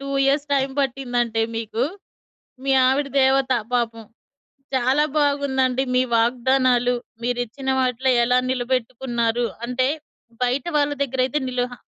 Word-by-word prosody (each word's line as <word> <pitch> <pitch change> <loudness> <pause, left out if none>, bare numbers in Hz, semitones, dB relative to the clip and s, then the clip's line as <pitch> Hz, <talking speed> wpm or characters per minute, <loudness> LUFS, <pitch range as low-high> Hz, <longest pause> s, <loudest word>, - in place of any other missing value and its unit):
2 275 - -7 0.2
years 280 +2 +1
time 270 -1 0
పట్టిందంటే 245 -4 -1
మీకు. 225 +1 -2 0.8
మీ 275 - +2
ఆవిడ 275 +2 +1
దేవత 265 0 +3 0.2
పాపం. 230 -2 -1 0.7
చాలా 260 +3 +2
బాగుందండి 275 -3 +1
మీ 255 - +4
వాగ్దానాలు 245 +1 +2 0.3
మీరిచ్చిన 245 +2 -3
వాటిలో 255 0 +1
ఎలా 250 +1 +2
నిలబెట్టుకున్నారు? 245 -2 -1 0.2
అంటే 250 +1 0 0.6
బయట 250 +2 +1
వాళ్ళ 290 0 +2
దగ్గరైతే 265 +1 0
నిల 250 -1 -1
హ - - -5
255 Hz, 115 wpm, -22 LUFS, 245-270 Hz, 0.8 s, మీ